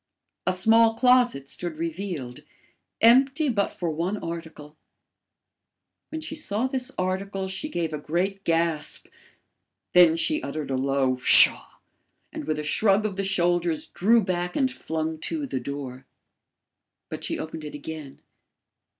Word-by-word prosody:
A - - +4
small 225 +4 +3
closet 245 - +3
stood 170 +1 -6
revealed, 165 -6 -5 0.6
empty 270 +6 +4
but 200 -5 0
for 170 -2 -4
one 170 +6 -2
article. 160 -4 -8 1.3
When 315 - -6
she 315 - -6
saw 245 -7 -2
this 260 -1 -3
article 190 +1 -3
she 190 +11 -5
gave 165 - -3
a 150 - -3
great 190 +6 -2
gasp; 165 -3 -1 0.9
then 175 -2 +6
she 310 - 0
uttered 150 -3 -5
a - - 0
low 135 -1 0
PSHAW! 125 - +7 0.6
and - - -6
with 155 -1 -2
a 150 - -4
shrug 200 +6 +2
of 205 -3 -3
the 195 - -2
shoulders 175 -4 0
drew 225 +4 +2
back 180 -1 -3
and 265 -2 +1
flung 160 -8 -4
to 300 - -3
the 135 - -4
door. 130 0 -7 1.0
But - - -7
she - - -2
opened 160 0 -7
it 150 - -8
again. 145 -2 -9
175 Hz, 140 wpm, -25 LUFS, 155-215 Hz, 1.3 s, PSHAW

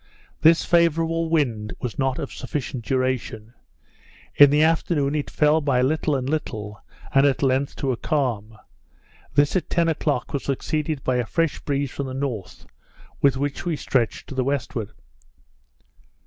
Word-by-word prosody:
This 165 +1 +5
favourable 165 -1 +2
wind 120 -10 0
was 125 +1 -5
not 135 -1 +1
of - - -5
sufficient 130 -2 -4
duration; 125 -3 -2 0.8
in 145 -1 +8
the 150 +2 +4
afternoon 160 -3 +1
it 150 -1 -2
fell 150 +1 +3
by 135 -4 +2
little 150 +2 +1
and 130 -1 -2
little, 105 -9 -4 0.3
and 135 0 +5
at 140 0 0
length 135 +1 +1
to 135 -3 -1
a 120 - -2
calm; 115 -9 -2 0.8
this 145 +3 +3
at 180 -5 -1
ten 170 0 +2
o'clock 155 -2 -1
was 140 - -2
succeeded 150 +1 -2
by 130 -1 +1
a 120 - 0
fresh 165 +3 0
breeze 140 -2 -2
from 140 - -4
the 130 - -6
north, 120 -10 -5 0.6
with 140 -2 +4
which 140 +1 -3
we 175 -2 -1
stretched 130 -5 -1
to - - -9
the 130 -1 0
westward. 125 -5 -2
140 Hz, 160 wpm, -23 LUFS, 125-150 Hz, 0.8 s, in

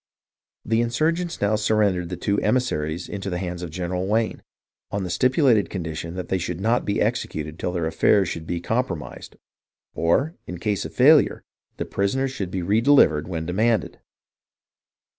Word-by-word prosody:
The 115 +1 +2
insurgents 165 +9 0
now 100 +1 +2
surrendered 105 -5 +1
the 90 - -4
two 100 0 0
emissaries 90 -9 -1
into 100 -1 -5
the 90 - -2
hands 90 -1 -4
of 90 - -5
General 90 +2 -3
Wayne, 110 +2 0 0.5
on 100 -1 -2
the 90 - -4
stipu 130 - +2
lated 110 -9 +4
condition 85 -2 -5
that 90 - -5
they 95 - 0
should 90 0 -4
not 115 +5 +1
be 100 - 0
executed 75 +1 -2
till 90 - -2
their 85 -2 -2
affairs 95 +4 +3
should 80 -1 -5
be 85 -1 -2
compromised, 95 -6 -3 0.6
or, 130 - +1
in 90 - -5
case 105 +2 -2
of - - -7
failure, - - +5 0.3
the - - -3
prisoners 130 +7 -1
should 100 -8 -4
be 90 -1 -3
redelivered 105 - +4
when 80 -3 -4
demanded. 110 +6 0
95 Hz, 165 wpm, -23 LUFS, 85-115 Hz, 0.6 s, failure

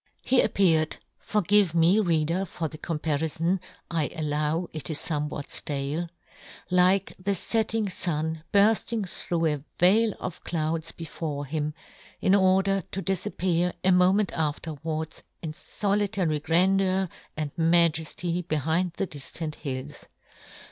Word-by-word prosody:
He 260 - +4
appeared 160 -5 +2
— - - -49
forgive 205 -3 +2
me, 170 +5 +5
Reader, 170 -1 +1
for 165 -2 -4
the 155 0 -9
com 165 -2 -3
parifon, 160 +4 0 0.3
I 160 -4 0
allow 155 +2 -1
it 155 - -5
isfomewhat 150 -2 -2
ftale^ 145 +4 -2 0.3
— - - -18 0.3
like 185 +2 +3
the 200 +2 0
fetting 220 +2 0
fun 160 -2 -2
burfling 215 +1 +3
through 170 -1 -2
a 150 -3 0
veil 210 +5 +4
of 185 - -6
clouds 160 0 -2
before 155 -3 -5
him, 150 +1 -3 0.4
in 190 - +3
order 195 0 +3
to 195 - -3
difappear, 180 -1 0
a 190 - +4
moment 185 +3 +4
afterwards, 160 0 -3 0.2
in 160 - -3
folitary 200 -3 0
grandeur 190 +3 +3 0.3
and 150 -2 -3
majefty 170 +1 +2
be 155 - 0
hind 165 +4 0
the 195 - -2
diftant 155 0 -5
hills. 140 -1 -6
170 Hz, 130 wpm, -26 LUFS, 155-190 Hz, 0.4 s, me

